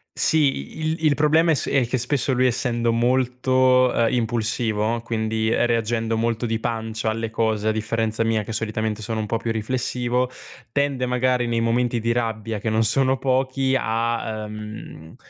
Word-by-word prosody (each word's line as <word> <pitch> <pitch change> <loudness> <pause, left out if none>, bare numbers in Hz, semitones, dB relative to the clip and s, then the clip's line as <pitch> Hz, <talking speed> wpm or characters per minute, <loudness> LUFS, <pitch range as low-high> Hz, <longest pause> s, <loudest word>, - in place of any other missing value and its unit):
Sì, 145 - +1
il 160 +1 -2
il 150 -2 +4
problema 155 +3 +3
è - - +5
se - - -2
è 130 -4 +2
che 130 - 0
spesso 130 +2 0
lui 130 0 +2
essendo 120 -1 +1
molto, 125 +1 +3
ehm, 115 0 +1
impulsivo, 115 -1 0
quindi, 110 -1 -1
ehm, 115 - +2
reagendo 115 -1 0
molto 115 +1 -1
di 115 -1 -1
pancia 110 -1 -2
alle 115 0 -3
cose 110 -2 0
a - - +3
differenza 110 0 -1
mia 110 -1 +1
che 110 - -7
solitamente 110 0 -2
sono 110 +1 -3
un - - -3
po' 115 +2 -1
più 115 0 -3
riflessivo, 125 +2 -1 0.4
tende 140 -1 0
magari 125 0 +1
nei 115 -1 0
momenti 120 +1 +1
di 115 +1 0
rabbia 115 -2 -2
che 110 - -2
non 110 +1 +2
sono 130 +4 +2
pochi 130 0 +1
a 115 -1 -1
ehm, 105 -6 -9
115 Hz, 175 wpm, -23 LUFS, 110-125 Hz, 0.4 s, è